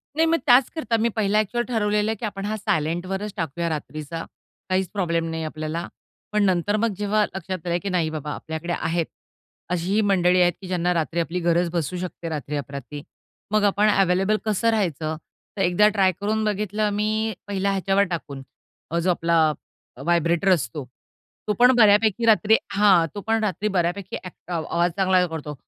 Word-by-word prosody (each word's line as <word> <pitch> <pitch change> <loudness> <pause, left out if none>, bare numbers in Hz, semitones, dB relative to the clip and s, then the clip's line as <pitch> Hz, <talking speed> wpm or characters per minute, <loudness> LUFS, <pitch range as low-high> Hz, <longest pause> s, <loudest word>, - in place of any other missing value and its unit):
नाही. 320 +1 +3
मग 330 +1 +3
त्याचकरता 250 -1 +3
मी 230 +2 +2
पहिला 210 -1 +1
ॲक्चुअल 240 +3 0
ठरवलेलं 210 -3 +1
आहे, - - -2
की 220 - -5
आपण 200 -2 -5
हा 215 +1 -2
सायलेंटवरच 185 +3 -2
टाकूया 170 +1 -2
रात्रीचा. 155 +1 -5 0.5
काहीच 185 -1 0
प्रॉब्लेम 170 -4 -1
नाही 160 0 -3
आपल्याला. 155 +2 -4 0.4
पण 210 0 +2
नंतर 190 +2 +1
मग 225 0 0
जेव्हा 210 +1 +1
लक्षात 185 -2 -6
आलं, 170 0 +1
की 200 - -2
नाही 175 -4 0
बाबा, 150 -1 -5
आपल्याकडे 160 +2 -5
आहेत. 165 0 -1 0.6
अशीही 180 +4 0
मंडळी 185 -3 +3
आहेत, 175 0 +4
की 190 - -8
ज्यांना 180 -1 0
रात्री 165 0 -1
आपली 170 +2 -1
गरज 170 0 +1
भासू 170 +1 -2
शकते 175 -2 -5
रात्री-अपरात्री. 145 -1 -5 0.5
मग 215 -1 +2
आपण 205 +1 +3
अवेलेबल 195 +1 +2
कसं 215 +1 +1
राहायचं? 165 -7 -1 0.4
तर - - -1
एकदा 185 +3 +4
ट्राय 195 -3 +3
करून 215 +2 0
बघितलं 210 0 0
मी 215 +1 0
पहिला 200 0 0
ह्याच्यावर 195 +1 +2
टाकून, 140 -5 -5 0.6
जो 180 - 0
आपला 170 -1 +2 0.6
व्हायब्रेटर 170 +2 +2
असतो. 140 -3 -3 0.6
तो 210 - +2
पण 250 +1 +7
बऱ्यापैकी 215 0 +4
रात्री 220 0 +5 0.2
हां. 195 -4 +5
तो 205 - -4
पण 225 0 +1
रात्री 210 0 -1
बऱ्यापैकी 185 0 -1
अक 180 -1 -11
आवाज 170 +1 0
चांगला 185 -1 +3
करतो. 155 -3 -6
185 Hz, 165 wpm, -23 LUFS, 170-210 Hz, 0.6 s, पण